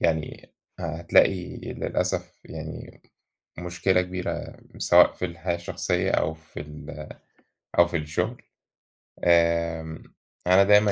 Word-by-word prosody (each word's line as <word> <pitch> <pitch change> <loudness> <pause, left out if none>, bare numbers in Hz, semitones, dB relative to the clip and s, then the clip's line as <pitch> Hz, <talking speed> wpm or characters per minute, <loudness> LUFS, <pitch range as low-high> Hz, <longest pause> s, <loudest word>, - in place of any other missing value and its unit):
يعني 80 -2 -1 0.3
هتلاقي 90 -2 +2
للأسف - - -3
يعني - - -8 0.6
مشكلة 90 +1 +1
كبيرة 90 0 -4 0.2
سواء - - +6
في - - -3
الحياة 85 0 -3
الشخصية 85 0 -1
أو 80 - +1
في 80 0 -12
ال 75 0 -9 0.7
أو 85 - +7
في 85 - -1
الشغل. 75 -1 -2 0.8
آآ، 85 -1 +2 0.4
أنا 95 +2 +7
دايمًا 105 +1 +6
85 Hz, 105 wpm, -26 LUFS, 80-90 Hz, 0.8 s, أو